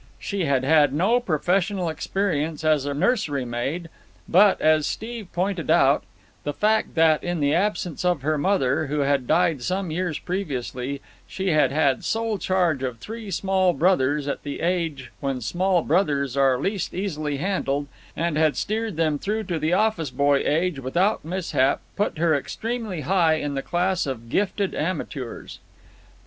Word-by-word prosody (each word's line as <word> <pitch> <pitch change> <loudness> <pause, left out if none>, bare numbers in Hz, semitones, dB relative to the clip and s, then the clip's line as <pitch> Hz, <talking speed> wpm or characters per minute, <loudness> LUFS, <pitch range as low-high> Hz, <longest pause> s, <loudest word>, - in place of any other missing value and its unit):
She 200 -4 -3
had 135 -3 +1
had 145 -1 +4
no 205 +10 +3
professional 180 -1 0
experience 160 -1 -2
as 155 -3 +2
a 145 - -1
nursery 160 - 0
maid; 135 +9 -3 0.4
but, 195 +3 +5
as 155 -1 +3
Steve 225 -2 -5
pointed 180 -1 -2
out, - - +4 0.4
the 145 - -2
fact 215 +6 +1
that, 160 -2 +4
in 175 -1 -2
the 145 0 +2
absence 180 -2 -1
of 175 -6 +1
her 155 +2 +1
mother, 150 -3 +1
who 145 +1 -1
had 140 -2 +1
died 165 -4 +2
some 185 +4 -2
years 170 -2 -2
previously, 140 -7 -4 0.3
she 190 0 -3
had 150 -5 +3
had 140 -3 +1
sole 225 -2 -1
charge 175 -7 +1
of 125 -3 -3
three 220 - -8
small 190 -1 +1
brothers 150 -5 +2
at 140 - -3
the 145 -1 -6
age 165 -8 -1
when 135 -2 -2
small 175 - +1
brothers 145 -6 +1
are 135 -2 +3
least 195 +6 -2
easily 155 -7 -2
handled, 145 -5 -1 0.3
and 165 -1 0
had 155 -1 +2
steered 220 -2 -2
them 155 -3 +1
through 215 +5 -2
to 175 -5 -3
the 155 +3 0
office 205 -8 +1
boy 140 +2 +2
age 160 0 0
without 175 +11 0
mishap, 165 -6 0 0.2
put 205 -5 -1
her 165 0 +2
extremely 215 - -3
high 170 -2 +3
in 145 -2 -3
the 135 - -2
class 180 +2 0
of 115 -4 -5
gifted 200 - 0
amateurs. 150 -7 -4
160 Hz, 160 wpm, -24 LUFS, 140-190 Hz, 0.4 s, but